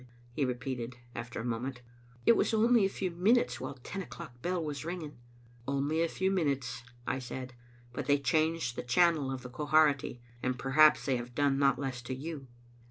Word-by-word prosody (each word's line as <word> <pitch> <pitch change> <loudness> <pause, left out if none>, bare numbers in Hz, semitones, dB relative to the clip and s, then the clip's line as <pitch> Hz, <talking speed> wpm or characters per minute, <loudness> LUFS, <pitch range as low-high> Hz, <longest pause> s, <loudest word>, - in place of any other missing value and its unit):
he 140 - -1
repeated, 125 -1 -3 0.2
after 120 -1 -5
a 115 - -4
moment. 125 +2 -3 0.2
" 120 0 -26
It - - +7
was 220 - +2
only 230 -1 +5
a - - +1
few 190 -2 -3
minutes, 175 - +2
while 130 +1 -5
the 125 - -21
ten 195 +9 -5
o'clock 140 -9 -10
bell 180 -1 -1
was 145 -2 -4
ringing." 160 -5 -6 0.3
" 120 0 -26
Only 140 +4 0
a 170 - +3
few 190 +3 0
minutes," 135 -9 0 0.2
I 130 - -1
said, 130 0 -6 0.2
" 120 0 -26
but 140 0 -4
they 145 0 +5
changed 155 -1 +1
the - - -3
channel 150 +1 +3
of 130 -1 -5
the 125 - -7
Quharity, 145 -2 +2 0.2
and 130 0 -1
perhaps 150 +4 +5
they 130 -3 +2
have 120 0 -7
done 140 -1 +2
not 140 -1 +4
less 130 -3 -3
to 130 +1 -4
you. 145 0 -6
140 Hz, 205 wpm, -31 LUFS, 125-160 Hz, 0.3 s, It